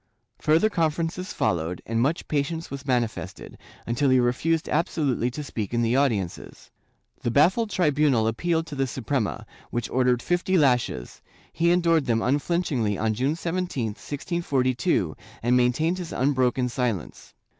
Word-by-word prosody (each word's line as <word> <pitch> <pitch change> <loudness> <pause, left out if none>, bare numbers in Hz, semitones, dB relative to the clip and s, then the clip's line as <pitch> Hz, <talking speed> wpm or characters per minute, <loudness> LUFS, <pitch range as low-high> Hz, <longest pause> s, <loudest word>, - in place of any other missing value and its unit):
Further 160 +7 +3
conferences 170 +1 -1
followed, 85 +1 -1
and 115 0 0
much 150 +7 0
patience 155 +3 -2
was 140 0 -7
manifested, 110 -8 -2 0.3
until 130 +4 +1
he 130 0 +5
refused 155 +7 +1
absolutely 145 -6 0
to 150 +4 -6
speak 115 -5 -4
in 120 - +2
the 115 +2 +2
audiences. 110 -11 -1 0.5
The - - -1
baffled 185 - +3
tribunal 150 - +2
appealed 160 +9 0
to 150 - -8
the 135 -1 0
Suprema, 125 -3 -2 0.2
which 120 -1 -3
ordered 125 -1 +2
fifty 175 +2 +1
lashes; 125 - +1 0.3
he 170 +1 +2
endured 170 -4 +3
them 115 -1 +2
unflinch 145 +5 0
ingly 105 -5 0
on 110 0 +1
June 130 +7 0
17, 170 -8 -2
1642, 135 - -1 0.3
and 120 +2 +3
maintained 140 +9 +2
his 175 -2 -6
unbroken 130 -2 +1
silence. 120 -7 -3
135 Hz, 145 wpm, -25 LUFS, 120-165 Hz, 0.5 s, he